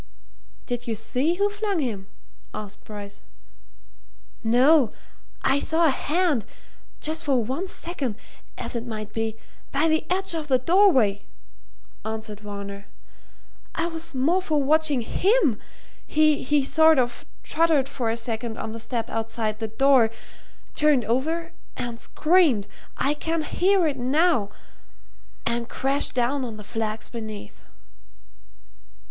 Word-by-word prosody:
"Did 245 Hz, 0 st, -4 dB
you 225 Hz, -, -1 dB
see 255 Hz, +9 st, 0 dB
who 400 Hz, +3 st, +2 dB
flung 410 Hz, -2 st, -2 dB
him?" 220 Hz, -10 st, -3 dB, 0.5 s
asked 210 Hz, -1 st, -7 dB
Bryce. 205 Hz, -1 st, -9 dB, 1.2 s
"No; 250 Hz, +3 st, +5 dB, 0.5 s
I 275 Hz, -, +3 dB
saw 325 Hz, +3 st, +2 dB
a 310 Hz, -, +5 dB
hand 300 Hz, -, +1 dB, 0.6 s
just 315 Hz, +1 st, -3 dB
for 265 Hz, -5 st, +2 dB
one 270 Hz, -, -3 dB
second, 290 Hz, -, -4 dB, 0.4 s
as -, -, -5 dB
it 235 Hz, +1 st, -3 dB
might 215 Hz, -2 st, -6 dB
be 225 Hz, -1 st, -2 dB, 0.4 s
by 290 Hz, +4 st, +2 dB
the 315 Hz, 0 st, +2 dB
edge 380 Hz, 0 st, 0 dB
of 315 Hz, -2 st, -3 dB
the 260 Hz, -3 st, +4 dB
doorway," 260 Hz, -, +4 dB, 0.8 s
answered 220 Hz, -1 st, -5 dB
Varner. 200 Hz, -1 st, -7 dB, 0.9 s
"I 325 Hz, -, 0 dB
was 330 Hz, -3 st, -5 dB
more 320 Hz, +9 st, +2 dB
for 305 Hz, -5 st, +1 dB
watching 300 Hz, -2 st, +3 dB
him! 355 Hz, -, +2 dB, 0.5 s
He 295 Hz, -2 st, +3 dB
sort 315 Hz, +2 st, +5 dB
of 245 Hz, -2 st, 0 dB, 0.2 s
tottered 315 Hz, -4 st, +2 dB
for 240 Hz, -5 st, -2 dB
a 225 Hz, -, -1 dB
second 230 Hz, 0 st, -3 dB
on 220 Hz, -, -4 dB
the 230 Hz, -, -6 dB
step 230 Hz, 0 st, -3 dB
outside 225 Hz, -1 st, -2 dB
the 220 Hz, -, -2 dB
door, 250 Hz, +1 st, +4 dB, 0.6 s
turned 295 Hz, -6 st, +3 dB
over 320 Hz, +9 st, -1 dB, 0.3 s
and 240 Hz, -2 st, -4 dB
screamed 305 Hz, -, +3 dB, 0.3 s
I 280 Hz, +2 st, +2 dB
can 320 Hz, +1 st, -2 dB
hear 375 Hz, +3 st, +2 dB
it 290 Hz, -3 st, 0 dB
now! 260 Hz, -, +2 dB, 1.0 s
and 235 Hz, 0 st, -1 dB
crashed 275 Hz, +2 st, +2 dB
down 255 Hz, +3 st, +1 dB
on 230 Hz, -4 st, -5 dB
the 210 Hz, -, -9 dB
flags 220 Hz, 0 st, -3 dB
beneath." 220 Hz, -3 st, -8 dB
260 Hz, 130 wpm, -25 LUFS, 225-315 Hz, 1.2 s, No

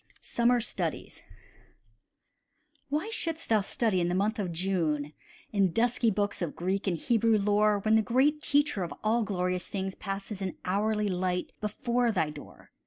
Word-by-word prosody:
SUMMER 240 Hz, +1 st, +2 dB
STUDIES -, -, -3 dB, 1.7 s
Why 310 Hz, +10 st, -1 dB
shouldst 330 Hz, -6 st, -2 dB
thou 220 Hz, -2 st, +4 dB
study 205 Hz, -2 st, 0 dB
in 170 Hz, -, +1 dB
the 175 Hz, -, 0 dB
month 210 Hz, +4 st, 0 dB
of 185 Hz, -4 st, -2 dB
June 160 Hz, -5 st, -1 dB, 0.4 s
In 195 Hz, -4 st, +2 dB
dusky 235 Hz, +3 st, +2 dB
books 205 Hz, -1 st, -1 dB
of 170 Hz, -4 st, -3 dB
Greek 190 Hz, +3 st, -2 dB
and 175 Hz, -3 st, +1 dB
Hebrew 225 Hz, +4 st, +2 dB
lore, 210 Hz, +1 st, +3 dB
When 215 Hz, +2 st, +1 dB
the 220 Hz, -, +6 dB
Great 270 Hz, +7 st, +2 dB
Teacher 290 Hz, -9 st, +1 dB
of 175 Hz, -, -3 dB
all 225 Hz, +2 st, +2 dB
glorious 180 Hz, -4 st, -1 dB
things 190 Hz, -1 st, -3 dB
Passes 195 Hz, +1 st, -5 dB
in 190 Hz, -2 st, -3 dB
hourly 210 Hz, +3 st, +1 dB
light 180 Hz, -1 st, -1 dB
before 235 Hz, +3 st, 0 dB
thy 160 Hz, -7 st, 0 dB
door? 150 Hz, -1 st, -13 dB
205 Hz, 160 wpm, -29 LUFS, 185-230 Hz, 1.7 s, the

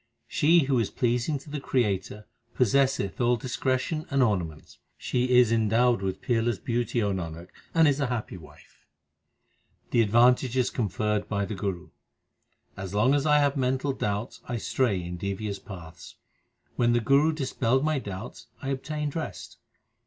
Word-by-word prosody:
She 165 Hz, +2 st, +4 dB
who 135 Hz, -2 st, +1 dB
is 115 Hz, -, 0 dB
pleasing 120 Hz, +4 st, 0 dB
to 140 Hz, +3 st, -13 dB
the 150 Hz, -, -3 dB
Creator 105 Hz, -5 st, -1 dB, 0.3 s
possesseth 130 Hz, -4 st, +1 dB
all 120 Hz, 0 st, +3 dB
discretion 130 Hz, +5 st, -2 dB
and 140 Hz, -3 st, +3 dB
ornaments; 85 Hz, -9 st, -2 dB, 0.2 s
She 125 Hz, 0 st, +1 dB
is 125 Hz, -2 st, +5 dB
endowed 115 Hz, +1 st, +3 dB
with 95 Hz, -1 st, -3 dB
peerless 120 Hz, -3 st, +1 dB
beauty, 120 Hz, -1 st, -1 dB
O 100 Hz, -, +1 dB
Nanak, 85 Hz, -1 st, -6 dB, 0.3 s
and 165 Hz, -1 st, +6 dB
is 145 Hz, 0 st, +2 dB
a 140 Hz, -, +1 dB
happy 120 Hz, -5 st, -4 dB
wife. 80 Hz, -4 st, -16 dB, 1.0 s
The 120 Hz, -, +4 dB
advantages 125 Hz, +3 st, +3 dB
conferred 105 Hz, -2 st, -1 dB
by 100 Hz, -2 st, 0 dB
the 110 Hz, -, -5 dB
Guru: 95 Hz, -2 st, -4 dB, 0.9 s
As 95 Hz, +1 st, -6 dB
long 115 Hz, +6 st, +4 dB
as 145 Hz, +1 st, +1 dB
I 150 Hz, 0 st, +5 dB
have 145 Hz, -1 st, +2 dB
mental 130 Hz, +1 st, 0 dB
doubts 105 Hz, -1 st, -3 dB
I 120 Hz, -, -2 dB
stray 115 Hz, -3 st, 0 dB
in 90 Hz, +1 st, -6 dB
devious 100 Hz, +2 st, -4 dB
paths: 85 Hz, -4 st, -11 dB, 0.6 s
When 120 Hz, -1 st, +3 dB
the 120 Hz, -, +3 dB
Guru 140 Hz, +7 st, +3 dB
dispelled 130 Hz, -3 st, 0 dB
my 155 Hz, -2 st, +1 dB
doubts 100 Hz, 0 st, -8 dB
I 135 Hz, -, -5 dB
obtained 150 Hz, +2 st, -3 dB
rest. 160 Hz, -, -6 dB
120 Hz, 155 wpm, -27 LUFS, 100-135 Hz, 1.0 s, and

